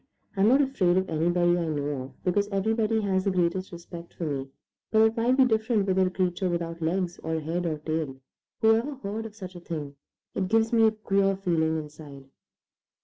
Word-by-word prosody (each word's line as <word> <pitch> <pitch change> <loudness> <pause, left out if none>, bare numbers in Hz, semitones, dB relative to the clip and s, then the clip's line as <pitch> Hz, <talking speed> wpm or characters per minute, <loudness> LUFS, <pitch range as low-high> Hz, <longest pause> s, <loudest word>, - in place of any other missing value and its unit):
I'm 195 +1 +3
not 265 +5 +5
afraid 190 -10 +2
of 190 0 +1
anybody 175 +2 +2
I 170 - -1
know 145 -3 -2
of, 130 - -12
because 200 +3 +1
everybody 220 +2 0
has 190 -2 0
the - - +3
greatest 185 0 0
respect 170 0 -10
for - - -5
me, 140 -4 -2 0.4
but 220 0 +4
it 220 0 +3
might 240 +3 +2
be 265 - +6
different 220 -2 +1
with 190 -1 +1
a 185 -1 +3
creature 185 0 -1
without 170 -1 -3
legs 175 +2 -1
or 160 0 -2
head 170 +3 -2
or 155 -2 -1
tail. 155 -2 -3 0.5
Whoever 225 +6 +3
heard 225 -3 -5
of 210 - -15
such 185 -4 -9
a - - -7
thing? 150 -5 -6 0.4
It 190 - -1
gives 225 +3 +2
me 225 -1 +6
a - - +3
queer 195 -2 +1
feeling 165 -4 0
inside." 150 -3 -9
185 Hz, 200 wpm, -27 LUFS, 165-215 Hz, 0.5 s, be